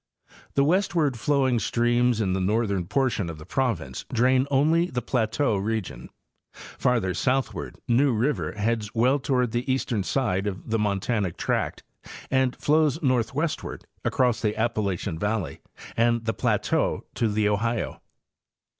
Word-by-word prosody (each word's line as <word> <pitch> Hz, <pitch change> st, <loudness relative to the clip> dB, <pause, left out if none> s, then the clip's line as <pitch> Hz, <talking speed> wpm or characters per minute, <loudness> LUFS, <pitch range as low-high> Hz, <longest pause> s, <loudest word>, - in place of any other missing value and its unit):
The 140 Hz, -, +4 dB
westward 165 Hz, -4 st, +2 dB
flowing 130 Hz, 0 st, +2 dB
streams 120 Hz, +2 st, +2 dB
in 95 Hz, -3 st, +1 dB
the 95 Hz, -, 0 dB
north 105 Hz, +3 st, +1 dB
ern 90 Hz, -3 st, -1 dB
portion 125 Hz, -9 st, 0 dB
of 80 Hz, -, -7 dB
the 75 Hz, -, -11 dB
province 105 Hz, -, -2 dB
drain 130 Hz, +3 st, +3 dB
only 155 Hz, +5 st, +3 dB
the 125 Hz, -, -2 dB
plateau 115 Hz, -1 st, +1 dB
region. 105 Hz, -1 st, -3 dB, 0.5 s
Far 125 Hz, -1 st, -1 dB
ther 95 Hz, -3 st, -2 dB
southward 110 Hz, -, -1 dB
New 130 Hz, +4 st, +4 dB
river 125 Hz, +6 st, 0 dB
heads 110 Hz, +1 st, -2 dB
well 125 Hz, +5 st, +3 dB
toward 125 Hz, -3 st, 0 dB
the 120 Hz, +3 st, -1 dB
eastern 125 Hz, -5 st, 0 dB
side 105 Hz, -3 st, 0 dB
of 95 Hz, +2 st, -5 dB
the 115 Hz, -, +2 dB
montanic 100 Hz, -2 st, -1 dB
tract -, -, -1 dB, 0.5 s
and 130 Hz, -1 st, +2 dB
flows 155 Hz, 0 st, +2 dB
northwestward 135 Hz, +4 st, -1 dB, 0.2 s
across 125 Hz, -3 st, +1 dB
the 105 Hz, -1 st, 0 dB
Appalachian 100 Hz, -6 st, -1 dB
valley 105 Hz, -7 st, -2 dB, 0.3 s
and 115 Hz, 0 st, +2 dB
the 115 Hz, -, 0 dB
plateau -, -, 0 dB
to 115 Hz, -, +1 dB
the 105 Hz, 0 st, +1 dB
Ohio. 115 Hz, +2 st, -1 dB
115 Hz, 145 wpm, -25 LUFS, 105-130 Hz, 0.5 s, The